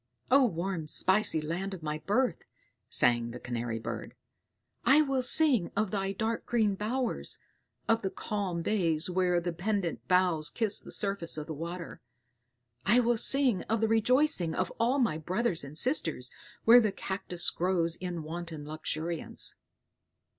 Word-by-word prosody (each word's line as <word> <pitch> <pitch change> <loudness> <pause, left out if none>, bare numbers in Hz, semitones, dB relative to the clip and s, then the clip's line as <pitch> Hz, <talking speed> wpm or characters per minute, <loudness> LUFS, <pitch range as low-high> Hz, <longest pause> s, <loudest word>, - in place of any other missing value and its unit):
"O 275 +1 +6
warm 175 -5 -3
spicy 190 0 +3
land 180 +5 -4
of 170 - -13
my 150 0 -3
birth," 210 +2 0 0.5
sang 120 -1 +3
the 120 +1 -8
Canary 120 -2 -4
bird; 115 - -7 0.7
"I 275 +5 +5
will 270 -2 -1
sing 255 - +5
of 210 -2 0
thy 195 -2 -2
dark 220 +3 -3
green 220 -4 +1
bowers, 230 +5 -2 0.5
of 225 0 +2
the 190 - -2
calm 190 -5 -4
bays 170 -4 0
where 180 -1 +1
the 175 0 -4
pendent 185 0 -3
boughs 180 -4 +2
kiss 220 -3 0
the - - -11
surface 195 -6 +2
of 150 - -5
the 160 - -6
water; 170 +3 -7 0.8
I 235 +5 +4
will 240 0 +2
sing 250 -4 +3
of 225 0 +1
the 225 - +1
rejoicing 225 - +3
of 185 - -2
all 245 +4 +2
my 230 - 0
brothers 185 +2 -2
and 140 +2 -8
sisters 160 - 0 0.3
where 235 +2 +8
the 215 -3 0
cactus 190 -3 -2
grows 170 -2 -1
in 175 -3 -5
wanton 160 -1 -7
luxuriance." 155 +2 -2
185 Hz, 155 wpm, -29 LUFS, 165-225 Hz, 0.8 s, where